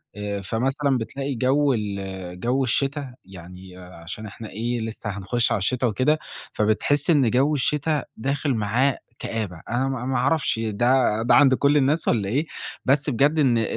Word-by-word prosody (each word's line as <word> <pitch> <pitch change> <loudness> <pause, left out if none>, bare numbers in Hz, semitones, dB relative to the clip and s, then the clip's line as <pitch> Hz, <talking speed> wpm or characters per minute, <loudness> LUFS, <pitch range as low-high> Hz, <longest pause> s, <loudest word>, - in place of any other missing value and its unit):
آآ، 105 -1 -4
فمثلًا 135 +7 0
بتلاقي 135 +4 -4
جَوّ 135 +4 +2
ال 95 -4 -5
جَوّ 125 +7 +1
الشِّتا 135 +1 -1
يعني 90 0 -12
آآ 90 0 -12
عشان 105 +6 -7
إحنا 110 +1 -9
إيه، 120 +4 -2
لسه 110 -1 -5
هنخُش 105 +4 -1
على - - +1
الشتا 125 +6 0
وكده 130 +8 +1 0.3
فبتحس 110 +8 +1
إن 140 -8 +4
جَوّ 135 +5 +3
الشِّتا 150 +2 0
داخل 140 +3 -1
معاه 120 +5 +1 0.2
كآبة، 100 -7 -4
أنا 125 +3 0
ما 130 -2 -3
ما 130 -1 0
عرفش 135 -2 +1
ده 115 +3 +1 0.3
ده 120 - +4
عَند 140 -3 +6
كلّ 140 +3 +3
الناس 145 +3 +1
والّا 100 -4 +1
إيه؟ 140 +9 0 0.4
بس 140 +2 +2
بجد 145 +5 +2
إن 130 -5 +4
أ - - +2
125 Hz, 170 wpm, -23 LUFS, 105-140 Hz, 0.4 s, عَند